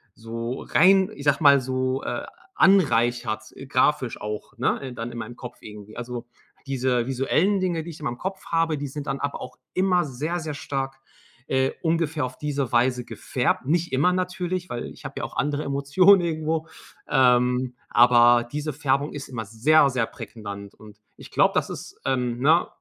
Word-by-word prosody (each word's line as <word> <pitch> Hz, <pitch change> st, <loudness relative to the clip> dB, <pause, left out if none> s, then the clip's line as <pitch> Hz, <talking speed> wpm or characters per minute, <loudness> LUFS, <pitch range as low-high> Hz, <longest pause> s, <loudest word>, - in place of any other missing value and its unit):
so 115 Hz, +2 st, -5 dB
rein, 190 Hz, +4 st, +4 dB
ich 140 Hz, -, -9 dB
sage 145 Hz, +2 st, +2 dB
mal, 140 Hz, -1 st, +7 dB
so, 130 Hz, +1 st, -1 dB
äh, -, -, -6 dB
ah, -, -, -4 dB, 0.3 s
anreichert 120 Hz, -, +3 dB, 0.2 s
grafisch 130 Hz, -2 st, +1 dB
auch, 105 Hz, +2 st, -6 dB
ne? 130 Hz, +1 st, -1 dB
Dann 115 Hz, +1 st, -5 dB
in 120 Hz, -, -8 dB
meinem 120 Hz, +2 st, -7 dB
Kopf 125 Hz, -1 st, -9 dB
irgendwie. 105 Hz, 0 st, -11 dB
Also, 120 Hz, 0 st, -6 dB, 0.4 s
diese 130 Hz, -3 st, 0 dB
visuellen 155 Hz, +10 st, +1 dB
Dinge, 175 Hz, -4 st, -1 dB
die 170 Hz, -, -7 dB
ich 160 Hz, -, -12 dB
immer 145 Hz, -, -2 dB
im 120 Hz, -, -6 dB
Kopf 190 Hz, +4 st, -5 dB
habe, 165 Hz, -2 st, +1 dB
die 145 Hz, -, -3 dB
sind 145 Hz, +1 st, -6 dB
dann 135 Hz, 0 st, -2 dB
aber 145 Hz, 0 st, -3 dB
auch -, -, -9 dB, 0.2 s
immer 185 Hz, -1 st, +3 dB
sehr, 150 Hz, +6 st, -3 dB
sehr 155 Hz, -3 st, -5 dB
stark, 135 Hz, -1 st, -4 dB, 0.5 s
äh, 130 Hz, 0 st, +1 dB
ungefähr 160 Hz, -3 st, 0 dB
auf 125 Hz, 0 st, -7 dB
diese 145 Hz, -3 st, -2 dB
Weise 125 Hz, 0 st, +2 dB
gefärbt. 130 Hz, 0 st, -1 dB
Nicht 170 Hz, -2 st, 0 dB
immer 150 Hz, +7 st, +3 dB
natürlich, 180 Hz, 0 st, -2 dB
weil 120 Hz, -1 st, -4 dB
ich -, -, -13 dB
habe -, -, -6 dB
ja -, -, -5 dB
auch -, -, -6 dB
andere 145 Hz, +1 st, 0 dB
Emotionen 140 Hz, +8 st, +4 dB
irgendwo, 160 Hz, -1 st, -2 dB, 0.4 s
ähm, 125 Hz, 0 st, +3 dB
aber 120 Hz, 0 st, +6 dB
diese 150 Hz, 0 st, -3 dB
Färbung 140 Hz, 0 st, 0 dB
ist 145 Hz, -2 st, -7 dB
immer 115 Hz, -4 st, -5 dB
sehr, 140 Hz, +8 st, +4 dB
sehr 125 Hz, -3 st, 0 dB
prägnant. 100 Hz, -2 st, -9 dB
Und 105 Hz, -1 st, -15 dB, 0.2 s
ich -, -, -13 dB
glaube, -, -, +3 dB
das -, -, 0 dB
ist, -, -, -9 dB
ähm, 125 Hz, -2 st, 0 dB
ne, 160 Hz, +6 st, +4 dB
135 Hz, 180 wpm, -24 LUFS, 120-155 Hz, 0.5 s, mal